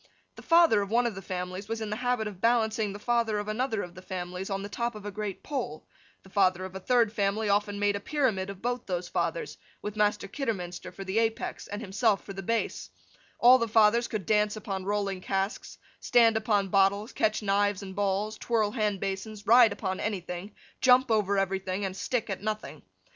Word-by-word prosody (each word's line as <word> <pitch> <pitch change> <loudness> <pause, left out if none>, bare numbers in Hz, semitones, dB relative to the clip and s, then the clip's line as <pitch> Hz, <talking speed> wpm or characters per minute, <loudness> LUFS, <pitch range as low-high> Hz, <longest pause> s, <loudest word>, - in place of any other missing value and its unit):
The - - -11
father 330 -11 +5
of 200 - -4
one 240 +3 +2
of 235 - 0
the 195 - -7
families 185 +1 -5
was 225 0 -2
in 215 -1 -4
the 210 - -2
habit 245 -2 0
of 195 -3 -9
balancing 220 -3 +2
the 200 - -7
father 230 -1 0
of 205 0 -3
another 220 0 -1
of 175 - -9
the 185 - -11
families 185 0 -5
on 195 0 -2
the - - -4
top 235 +3 -3
of 210 -1 -9
a 205 - -4
great 205 -1 -5
pole; 250 - -4 0.4
the 190 - -16
father 185 -2 +2
of 190 - -8
a 190 - -5
third 230 +1 +2
family 205 +1 0
often 205 0 +1
made 205 0 +1
a - - -2
pyramid 220 -7 0
of 195 0 -9
both 245 0 -2
those 180 -2 -2
fathers, 485 - -2 0.2
with 210 0 -6
Master 210 -1 +1
Kidderminster 195 -8 -4
for 195 +2 -8
the 190 +3 0
apex, 225 0 -2
and 205 +2 -5
himself 205 +1 +1
for 195 - -8
the 195 - -6
base; 190 - -2 0.5
all 250 +2 +7
the 230 - 0
fathers 225 +2 +4
could 210 -5 -4
dance 210 +1 +2
upon 195 -3 -5
rolling 200 -2 -1
casks, 195 +2 -3 0.2
stand 230 -2 +4
upon 210 -3 +1
bottles, 200 +4 +2
catch 215 0 0
knives 200 0 +1
and 190 -1 -8
balls, 205 +2 -1
twirl 220 -3 +1
hand 210 -4 -1
basins, 200 +2 -4
ride 235 0 +7
upon 190 -2 -3
anything, 190 -1 -4 0.3
jump 255 -1 +5
over 205 -2 +2
everything, 195 0 -1
and 190 -1 -4
stick 240 +3 -2
at 195 -2 -4
nothing. 215 0 -4
205 Hz, 205 wpm, -28 LUFS, 195-225 Hz, 0.5 s, all